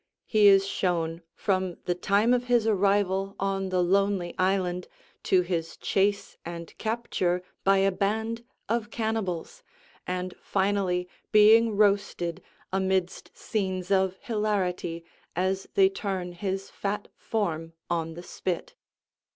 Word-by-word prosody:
He 215 -2 +5
is 195 -1 +7
shown 170 -4 -1
from 185 -3 0
the 175 - +1
time 200 +6 +2
of 245 0 +1
his 240 -3 +3
arrival 195 -2 +2
on 195 -1 -1
the 185 -1 +2
lonely 195 -1 +1
island 185 -1 +1 0.4
to 185 - +4
his 170 -2 -3
chase 200 +1 0
and 170 -1 -7
capture 200 -6 -1 0.2
by 195 0 +5
a 195 - +3
band 220 +4 -1 0.2
of 225 -1 -1
cannibals, 220 - -3 0.5
and 180 0 -2
finally 190 -2 0 0.2
being 215 +1 +6
roasted 200 -5 +1 0.3
amidst 190 -1 -1
scenes 190 -3 -2
of 190 -1 +2
hilarity 195 -8 -1 0.3
as 190 +2 0
they 390 -1 +7
turn 195 - -3
his 190 +2 -4
fat 205 +1 -3
form 165 -7 -2
on 165 -2 -2
the 175 - -8
spit. 180 -1 -4
195 Hz, 125 wpm, -27 LUFS, 180-210 Hz, 0.5 s, is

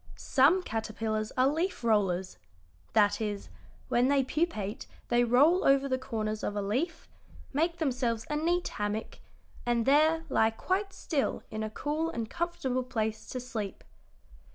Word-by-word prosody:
"Some 305 +8 +3
caterpillars 220 -2 -2
are 255 +1 +5
leaf 320 0 -1
rollers 190 -5 +1 0.6
that 205 +1 +3
is, 205 -2 -3 0.4
when 245 +1 +3
they 275 -1 +3
pupate 250 - -2 0.2
they 240 0 +4
roll 285 +10 +4
over 275 0 +4
the 260 -1 0
corners 215 -4 -3
of 205 - -2
a 205 - 0
leaf, 265 - -2 0.5
make 335 +4 +1
themselves 250 -7 -1
a 300 - -2
neat 345 +4 +1
hammock, 210 +1 -4 0.4
and 240 -1 +1
there 315 +4 +4
lie 220 -6 +3
quite 375 - -1
still 300 -7 -2
in 215 0 -3
a 215 - -2
cool 300 +8 -2
and 230 -8 -4
comfortable 335 -7 -1
place 220 -3 -3
to 255 - -3
sleep." 220 -5 -5
250 Hz, 150 wpm, -30 LUFS, 220-305 Hz, 0.6 s, are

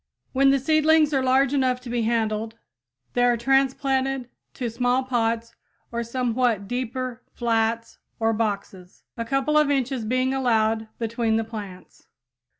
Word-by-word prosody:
When 275 +1 +4
the 275 - +4
seedlings 310 +2 +3
are 270 - +2
large 265 +1 +3
enough 260 -2 +1
to 250 - -9
be 240 -1 0
handled 220 -1 -1 0.6
they 245 - +2
are 245 -1 +3
transplanted 270 0 +1 0.3
to 250 - -3
small 245 +3 +1
pots 230 -2 -1 0.4
or 235 0 -2
somewhat 235 -3 0
deeper 255 +1 -4
flats 230 -1 -1 0.2
or 225 0 +2
boxes, 200 -4 -4
a 230 - -3
couple 275 +4 +2
of 300 -1 +2
inches 265 -3 0
being 255 +4 0
allowed 225 -4 +1
between 230 -1 -1
the 225 - +1
plants. 205 -5 -10
245 Hz, 145 wpm, -24 LUFS, 225-265 Hz, 0.6 s, When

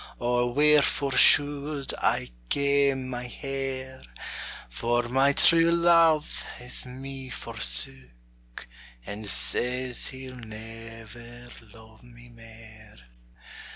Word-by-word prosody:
Or 120 0 -1
wherefore 145 -1 +2
should 145 +1 +3
I 60 - 0 0.2
kame 140 -2 +1
my 125 -1 -6
hair? 135 0 -6 0.7
For 120 - -2
my 135 +3 +2
true 165 +3 +5
love 165 -2 +3 0.2
has 125 +1 -2
me 135 +1 -9
forsook, - - -1 0.4
And 105 +1 -7
says 125 +4 0
he'll 130 -1 -8
never 115 +1 -12 0.2
lo'e 110 0 -18
me 120 0 -17
mair. 110 - -16
125 Hz, 90 wpm, -26 LUFS, 115-135 Hz, 0.7 s, true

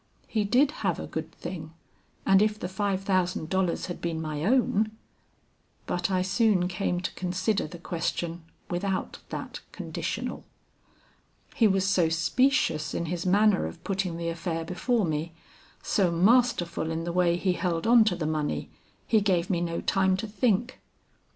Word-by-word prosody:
He 215 -2 0
did 260 +7 +4
have 190 -6 0
a - - -4
good 160 0 -5
thing, 165 -2 -7 0.5
and 195 0 +5
if 215 0 +2
the - - -3
five 195 0 -1
thousand 185 -4 0
dollars 190 -2 0
had 175 - -6
been 165 -2 -2
my 155 -2 -3
own 220 -1 +2 1.0
But 175 +1 -1
I 185 -1 +1
soon 195 -1 +2
came 180 -1 -1
to 180 - -3
consider 185 +2 -1
the 175 - -9
question 170 0 -3 0.3
without 190 +2 -2
that - - -6
conditional. - - -4 1.1
He 225 - +4
was 195 -1 +2
so 180 -4 +3
specious 165 - +1
in 170 - -1
his 175 +1 -3
manner 205 +1 +4
of 170 - -10
putting 190 -3 -2
the 170 0 -2
affair 165 -1 -3
before 215 +5 0
me, 160 +1 -2 0.5
so 195 -5 +2
masterful 180 -2 +2
in 165 0 -2
the 170 0 -3
way 175 -1 +3
he 185 +1 +1
held 175 -1 -1
on 235 0 +7
to 200 -5 +2
the 170 -3 -3
money, 155 -1 -2 0.3
he 220 -2 +3
gave 185 -2 +1
me 175 -2 +1
no 170 -1 -2
time 190 -1 +2
to 205 - -3
think. 230 +2 0
180 Hz, 165 wpm, -27 LUFS, 170-200 Hz, 1.1 s, on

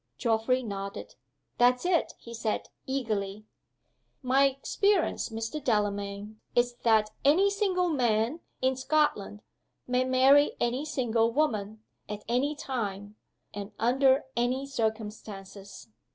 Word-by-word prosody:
Geoffrey 230 - +1
nodded. 200 -2 -6 0.5
"That's 250 +4 +4
it!" 355 -2 +1
he 235 - -11
said, 220 -2 -2 0.2
eagerly. 215 -6 -2 0.8
"My 265 +2 +4
experience, 335 +8 0
Mr. 225 +6 -4
Delamayn, 205 -1 -2
is 245 0 +3
that 220 -2 +2
any 365 +8 +4
single 385 -3 +1
man, 245 -1 +1 0.2
in 260 0 +3
Scotland, 260 -7 0 0.4
may 250 0 +1
marry 265 +3 +5
any 250 +5 0
single 235 -6 +1
woman, 220 -6 -1 0.3
at 210 0 -6
any 260 +6 0
time, 205 -7 -4 0.4
and 205 0 -7
under 265 +4 +3
any 250 +3 0
circumstances. 210 - -5
240 Hz, 110 wpm, -28 LUFS, 215-270 Hz, 0.8 s, marry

